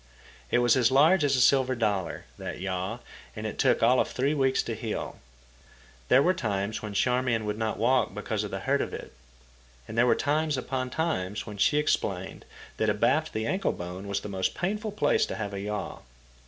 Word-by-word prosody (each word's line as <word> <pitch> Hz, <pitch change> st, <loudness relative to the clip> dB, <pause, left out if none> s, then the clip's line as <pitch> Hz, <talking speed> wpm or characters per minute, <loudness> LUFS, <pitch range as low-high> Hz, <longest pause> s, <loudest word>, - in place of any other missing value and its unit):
It -, -, +2 dB
was 120 Hz, -1 st, +4 dB
as 125 Hz, -2 st, +4 dB
large 155 Hz, +6 st, +5 dB
as 140 Hz, -1 st, +3 dB
a -, -, +1 dB
silver 130 Hz, 0 st, +4 dB
dollar, 100 Hz, -7 st, -1 dB
that -, -, -6 dB
yaw, 95 Hz, +5 st, -3 dB, 0.3 s
and 110 Hz, 0 st, -6 dB
it 110 Hz, -, -5 dB
took -, -, +3 dB
all 125 Hz, +3 st, +5 dB
of -, -, +2 dB
three 135 Hz, +4 st, 0 dB
weeks 135 Hz, -3 st, +2 dB
to 115 Hz, -, -4 dB
heal. 110 Hz, 0 st, -5 dB, 0.9 s
There 135 Hz, -, +5 dB
were 180 Hz, -, +3 dB
times 105 Hz, -, -2 dB
when 105 Hz, -2 st, -6 dB
Charmian 125 Hz, -2 st, +1 dB
could 105 Hz, +1 st, -3 dB
not 110 Hz, -1 st, -1 dB
walk 125 Hz, +1 st, +2 dB
because 105 Hz, 0 st, -2 dB
of 105 Hz, -, -4 dB
the 95 Hz, 0 st, -5 dB
hurt 140 Hz, +4 st, +1 dB
of -, -, -3 dB
it; -, -, -9 dB, 0.7 s
and -, -, -7 dB
there 120 Hz, +2 st, +4 dB
were -, -, +4 dB
times 150 Hz, 0 st, 0 dB
upon 130 Hz, 0 st, -3 dB
times 110 Hz, -, -2 dB
when 105 Hz, -2 st, -8 dB
she 125 Hz, +9 st, +3 dB
explained 95 Hz, -11 st, -1 dB, 0.3 s
that 110 Hz, -, +1 dB
abaft 125 Hz, +10 st, +1 dB
the 110 Hz, 0 st, -2 dB
ankle 190 Hz, +9 st, 0 dB
bone 90 Hz, +3 st, -7 dB
was 100 Hz, 0 st, -2 dB
the -, -, -6 dB
most 95 Hz, -2 st, -2 dB
painful 210 Hz, +4 st, -2 dB
place 210 Hz, -, +2 dB
to -, -, -4 dB
have 105 Hz, -2 st, -4 dB
a 100 Hz, -, -4 dB
yaw. 105 Hz, +1 st, -4 dB
115 Hz, 205 wpm, -27 LUFS, 105-135 Hz, 0.9 s, large